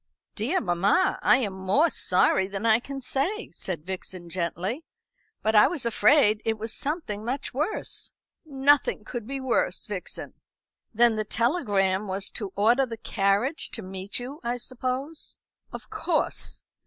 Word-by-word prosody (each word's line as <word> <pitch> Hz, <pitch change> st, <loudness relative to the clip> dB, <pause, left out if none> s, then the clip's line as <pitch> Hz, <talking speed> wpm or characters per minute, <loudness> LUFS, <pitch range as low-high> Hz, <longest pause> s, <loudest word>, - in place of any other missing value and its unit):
"Dear 255 Hz, -, 0 dB
mamma, 195 Hz, -, +2 dB
I -, -, +5 dB
am 215 Hz, -7 st, -1 dB
more 195 Hz, -, +2 dB
sorry 185 Hz, +1 st, +3 dB
than 195 Hz, +2 st, -4 dB
I 225 Hz, 0 st, +5 dB
can 275 Hz, +2 st, -7 dB
say," 310 Hz, -, -2 dB
said 165 Hz, -5 st, -6 dB
Vixen 185 Hz, -2 st, -6 dB
gently; 185 Hz, -, -2 dB, 0.6 s
"but 220 Hz, -, +2 dB
I 210 Hz, -, +7 dB
was 305 Hz, -8 st, -3 dB
afraid 230 Hz, -2 st, +4 dB
it 225 Hz, -1 st, 0 dB
was 225 Hz, +1 st, -3 dB
something 280 Hz, -, -3 dB
much 255 Hz, +4 st, -3 dB
worse." 305 Hz, -, -3 dB, 0.3 s
"Nothing 280 Hz, -5 st, +2 dB
could 230 Hz, -1 st, -6 dB
be 275 Hz, +1 st, -3 dB
worse, 260 Hz, -2 st, 0 dB
Vixen." -, -, -6 dB, 0.6 s
"Then 235 Hz, 0 st, +4 dB
the 215 Hz, -, +1 dB
telegram 205 Hz, -, +1 dB
was 195 Hz, +1 st, -2 dB
to 205 Hz, -5 st, -4 dB
order 240 Hz, +6 st, +4 dB
the 230 Hz, -1 st, -6 dB
carriage 210 Hz, +8 st, 0 dB
to 225 Hz, -, -4 dB
meet 190 Hz, +1 st, -4 dB
you, 260 Hz, +5 st, -6 dB
I 240 Hz, +1 st, -1 dB
suppose?" 255 Hz, +5 st, -4 dB, 0.3 s
"Of -, -, -9 dB
course. -, -, -2 dB
230 Hz, 150 wpm, -26 LUFS, 195-270 Hz, 0.6 s, I